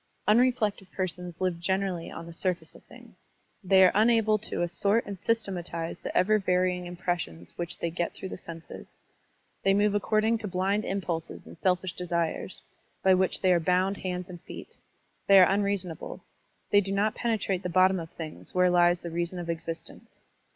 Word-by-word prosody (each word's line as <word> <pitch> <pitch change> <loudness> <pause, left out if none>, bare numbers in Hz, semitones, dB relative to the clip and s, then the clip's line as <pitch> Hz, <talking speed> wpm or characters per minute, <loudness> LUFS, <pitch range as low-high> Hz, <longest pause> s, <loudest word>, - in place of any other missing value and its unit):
Unreflective 215 -4 +2
persons 180 -2 -4
live 180 -2 0
generally 190 -1 -1
on - - -8
the 170 - -9
stuface 180 +1 -2
of - - -16
things. - - -17 0.3
They 190 0 +6
are 185 - +7
unable 220 0 +4
to 200 - -2
assort 200 +6 +1
and 200 - -5
sys 225 +4 0
tematize 170 -3 -4
the - - -3
ever 215 +3 +4
varying 180 -1 0
impressions 175 - -4
which 175 +1 -4
they 170 - -2
get 170 +1 -2
through 190 - -6
the - - -5
senses. 165 -2 -10 0.6
They 195 0 +3
niove 205 0 +3
accord 215 +1 +1
ing 225 0 +2
to 215 - -5
blind 195 +3 0
impulses 175 -4 -4
and - - -12
selfish 180 -1 +1
desires, 170 0 -2 0.4
by 190 - +6
which 185 0 +1
they 185 -1 +4
are 175 - +3
bound 185 +4 +1
hands 180 -1 -4
and 175 -3 -10
feet. - - -10 0.5
They 195 - +8
are 185 - +9
unrea 200 +2 +2
sonable. 175 -3 -8 0.5
They 205 - +6
do 195 0 -4
not 205 +2 +1
penetrate 210 -6 -1
the 180 - -3
bottom 185 +1 +4
of 165 -1 -7
things 160 +1 -9
where 180 0 +4
lies 175 0 +4
the 170 - -6
reason 170 +2 -2
of 170 -1 -3
existence. 165 0 -7
185 Hz, 185 wpm, -28 LUFS, 175-200 Hz, 0.6 s, are